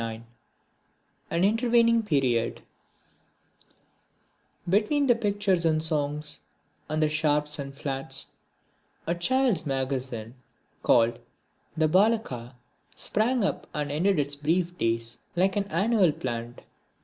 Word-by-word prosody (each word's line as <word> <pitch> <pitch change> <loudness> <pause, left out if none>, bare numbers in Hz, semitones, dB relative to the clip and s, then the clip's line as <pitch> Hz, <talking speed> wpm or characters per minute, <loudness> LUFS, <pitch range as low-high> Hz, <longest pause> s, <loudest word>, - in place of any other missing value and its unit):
(39) 115 +1 -9 1.0
An 170 - 0
Intervening 230 +2 +3
Period 130 - 0 2.1
Between 215 - +2
the 250 - +5
Pictures 205 -5 0
and 155 -1 +2
Songs 150 -1 -1 0.5
and 155 +1 0
the - - +4
Sharps 150 -1 +1
and 140 -1 -5
Flats, 135 -2 -3 0.7
a 170 - 0
child's 240 +2 +1
magazine 130 -4 -3 0.5
called 115 0 +3 0.6
the 160 0 +3
Balaka 180 - +1 0.4
sprang 235 +2 0
up 195 - -2
and 145 -1 -2
ended 180 +6 +1
its 145 -1 0
brief 170 +4 0
days 115 +1 -1 0.2
like 190 +2 +2
an 205 -1 0
annual 195 0 +2
plant. 120 -3 -5
155 Hz, 110 wpm, -27 LUFS, 135-200 Hz, 2.1 s, the